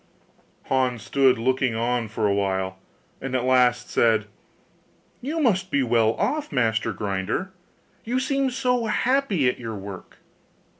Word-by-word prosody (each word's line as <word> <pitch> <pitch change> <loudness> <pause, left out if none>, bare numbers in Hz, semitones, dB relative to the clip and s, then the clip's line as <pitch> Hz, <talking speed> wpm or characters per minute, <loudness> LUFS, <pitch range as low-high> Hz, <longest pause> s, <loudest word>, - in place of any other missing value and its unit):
Hans 130 -3 0
stood 135 -2 +3
looking 130 0 0
on 120 0 0
for 110 0 -2
a 100 - +3
while, 95 -1 -1 0.4
and 135 -1 -3
at 125 - 0
last 125 -1 +3
said, 110 -2 +3 1.0
'You 300 +6 -3
must 195 - +1
be 140 -5 +1
well 115 -2 +3
off, 305 -1 -1
master 115 -4 +1
grinder! 100 - -3 0.5
you 245 +3 -1
seem 275 0 0
so 250 -2 0
happy 220 - +1
at 125 - 0
your 115 -3 -5
work. 100 -1 -9
125 Hz, 140 wpm, -24 LUFS, -, 1.0 s, stood